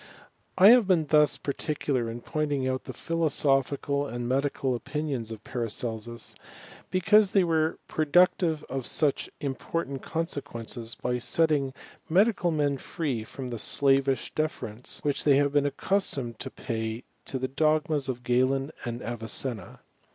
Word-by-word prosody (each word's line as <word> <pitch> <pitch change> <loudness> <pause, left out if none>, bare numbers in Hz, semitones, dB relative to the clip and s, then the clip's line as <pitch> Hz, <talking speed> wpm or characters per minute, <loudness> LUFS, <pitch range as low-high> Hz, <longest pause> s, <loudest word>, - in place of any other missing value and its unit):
I 190 +2 +9
have 240 -3 +7
been 175 -5 +3
thus 150 0 +4
particular 140 -4 -2
in 120 +1 -6
pointing 145 -3 -1
out 130 0 -2
the - - -5
phi 165 - -6
losophical 140 -3 +1
and 120 0 -3
medical 135 0 0
opinions 135 -2 -3
of 110 -1 -8
Paracelsus, 115 -1 -3 0.6
because 200 +2 +4
they 195 - +5
were 160 -2 +1
productive 160 0 +3
of 130 -1 -4
such 150 -3 +1
important 140 0 -3
consequences, 125 -8 -4
by 125 0 -2
setting 140 +2 +2 0.4
medical 195 +1 +3
men 145 -4 0
free 140 -10 -3
from 125 +3 -7
the 120 - -4
slavish 135 +1 +2
deference 125 -7 -3
which 145 -1 0
they 145 -2 +5
had 145 0 +2
been 145 0 +3
accustomed 140 - -1
to - - -4
pay 110 +1 -4 0.2
to 135 - -3
the 130 0 -2
dogmas 155 0 +1
of 125 -1 -4
Galen 130 +3 +1
and 120 0 -4
Avicenna. 115 -2 -4
140 Hz, 140 wpm, -27 LUFS, 120-155 Hz, 0.6 s, I